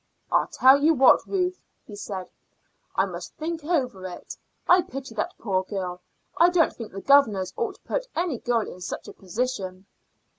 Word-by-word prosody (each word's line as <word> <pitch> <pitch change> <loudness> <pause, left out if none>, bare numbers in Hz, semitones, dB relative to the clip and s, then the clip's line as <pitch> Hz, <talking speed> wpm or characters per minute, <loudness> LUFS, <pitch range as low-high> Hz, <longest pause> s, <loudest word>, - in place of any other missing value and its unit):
"I - - +3
tell 265 +2 +6
you 320 +1 +5
what, 265 -1 +5
Ruth," 365 -1 -1 0.2
he 210 - -10
said; 195 -3 -6 0.6
"I - - +3
must - - -8
think 325 0 -4
over 255 - -1
it. 180 - -9 0.3
I 360 +1 +7
pity 275 -5 -8
that 215 - -3
poor 190 -4 0
girl. 185 -2 -5 0.4
I 345 - +6
don't 350 -3 +3
think 230 -2 -8
the 195 - -7
governors 220 -10 +4
ought 450 -4 -2
to - - -24
put - - -3
any 335 -8 -1
girl 240 -2 +1
in 180 - -10
such - - -5
a - - -9
position." 190 -2 -4
250 Hz, 180 wpm, -25 LUFS, -, 0.6 s, I